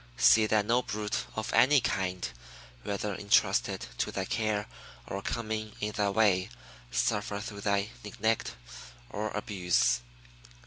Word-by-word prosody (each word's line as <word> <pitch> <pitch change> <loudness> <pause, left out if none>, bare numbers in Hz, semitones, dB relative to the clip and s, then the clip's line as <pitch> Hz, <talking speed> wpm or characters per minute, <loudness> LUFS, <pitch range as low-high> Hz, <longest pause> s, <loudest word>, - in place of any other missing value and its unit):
See 110 -1 +6
that 105 -1 +2
no 120 +3 +3
brute 105 -3 -3
of 110 - -3
any 140 +2 +6
kind, 90 - -1 0.5
whether 100 +5 -2
intrusted 100 +1 +2
to - - 0
thy 95 - -2
care 110 -1 0 0.4
or 100 - -4
coming 110 -1 -3
in 105 0 -1
thy 105 -1 +1
way, 100 -3 +3 0.4
suffer 100 +12 0
through 105 -1 -7
thy 100 +1 0
neglect 110 +2 -1 0.6
or 110 +1 -2
abuse. 95 - +1
105 Hz, 130 wpm, -30 LUFS, 100-110 Hz, 0.6 s, See